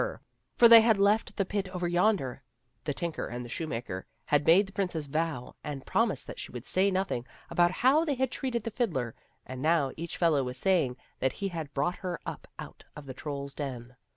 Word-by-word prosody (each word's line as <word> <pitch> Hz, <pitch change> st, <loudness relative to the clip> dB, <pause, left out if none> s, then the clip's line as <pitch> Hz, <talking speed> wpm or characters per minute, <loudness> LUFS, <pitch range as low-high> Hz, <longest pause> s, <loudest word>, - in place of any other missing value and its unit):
For -, -, -5 dB, 0.4 s
before 235 Hz, -, +8 dB
they 230 Hz, -1 st, +11 dB
had 220 Hz, -2 st, +4 dB
left 205 Hz, +3 st, +2 dB
the 195 Hz, -, +1 dB
pit 195 Hz, 0 st, -2 dB
over 180 Hz, -1 st, -2 dB
yonder, 175 Hz, -, +1 dB, 0.4 s
the 145 Hz, -, -1 dB
tinker 170 Hz, -2 st, -3 dB
and 120 Hz, 0 st, -5 dB
the -, -, -9 dB
shoemaker 115 Hz, -, -4 dB, 0.2 s
had 145 Hz, 0 st, +2 dB
made 180 Hz, +5 st, +7 dB
the 195 Hz, -, -12 dB
princess 180 Hz, -6 st, -2 dB
vow 150 Hz, -3 st, -2 dB
and 140 Hz, -3 st, -6 dB
promise -, -, +1 dB
that -, -, -9 dB
she -, -, -6 dB
would 125 Hz, 0 st, -7 dB
say 190 Hz, +6 st, +2 dB
nothing 185 Hz, -10 st, -1 dB, 0.3 s
about 175 Hz, 0 st, +4 dB
how 265 Hz, -, +3 dB
they 295 Hz, -4 st, 0 dB
had 260 Hz, 0 st, 0 dB
treated 245 Hz, -5 st, -2 dB
the 230 Hz, -, -4 dB
fiddler, 150 Hz, -, -1 dB, 0.3 s
and 130 Hz, +1 st, -7 dB
now 155 Hz, -3 st, +2 dB
each 170 Hz, +1 st, -5 dB
fellow 160 Hz, -5 st, +3 dB
was 125 Hz, 0 st, -4 dB
saying 150 Hz, -7 st, +2 dB, 0.2 s
that 130 Hz, 0 st, +1 dB
he 195 Hz, -, -3 dB
had 160 Hz, -5 st, -5 dB
brought 150 Hz, +6 st, 0 dB
her 180 Hz, -3 st, -4 dB
up -, -, -6 dB
out -, -, -9 dB
of 150 Hz, -, -9 dB
the 130 Hz, -, -7 dB
troll's 140 Hz, 0 st, -5 dB
den. 125 Hz, -4 st, -6 dB
165 Hz, 210 wpm, -29 LUFS, 135-195 Hz, 0.4 s, they